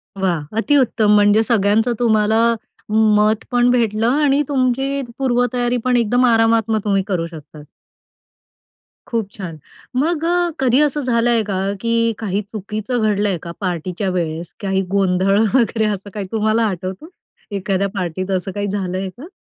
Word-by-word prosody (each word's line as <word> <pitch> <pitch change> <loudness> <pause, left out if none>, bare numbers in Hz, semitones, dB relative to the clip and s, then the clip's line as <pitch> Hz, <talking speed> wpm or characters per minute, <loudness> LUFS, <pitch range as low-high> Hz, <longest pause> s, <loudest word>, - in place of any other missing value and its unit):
वाह! 185 -5 0 0.2
अतिउत्तम, 235 -4 +2
म्हणजे 205 +1 +4
सगळ्यांचं 225 +1 +2
तुम्हाला 220 -2 +2 0.8
मत 215 +1 +2
पण 245 0 +3
भेटलं 225 -2 +1
आणि 285 +1 +2
तुमची 270 0 0 0.2
पूर्वतयारी 245 -1 0
पण 250 -1 +3
एकदम 245 +2 +2
आरामात 225 -1 +3
मग 220 - +2
तुम्ही 195 -2 +1
करू 180 -5 -1
शकतात. 155 -2 -12 1.4
खूप 225 -4 -2
छान. 175 -7 -8 0.4
मग 310 +4 0
अ, 350 0 +1
कधी 260 0 +3
असं 295 0 +1
झालंय 235 -2 +1
का? 200 -2 -3 0.2
की 230 - -1 0.3
काही 205 -2 -1
चुकीचं 215 +3 -4
घडलंय 205 -3 +1
का - - -5
पार्टीच्या 185 +1 -2
वेळेस? 170 -2 -3
काही 195 -1 0
गोंधळ 195 +1 +2
वगैरे, 230 -3 +2
असं 205 -1 -3
काही 205 -2 -4
तुम्हाला 220 +1 +1
आठवतो? 190 - -5 0.4
एखाद्या 195 0 -1
पार्टीत 185 +1 -3
असं 190 +1 -1
काही 205 +2 -3
झालंय 190 -1 -3
का? 280 +7 -10
215 Hz, 140 wpm, -19 LUFS, 195-245 Hz, 1.4 s, म्हणजे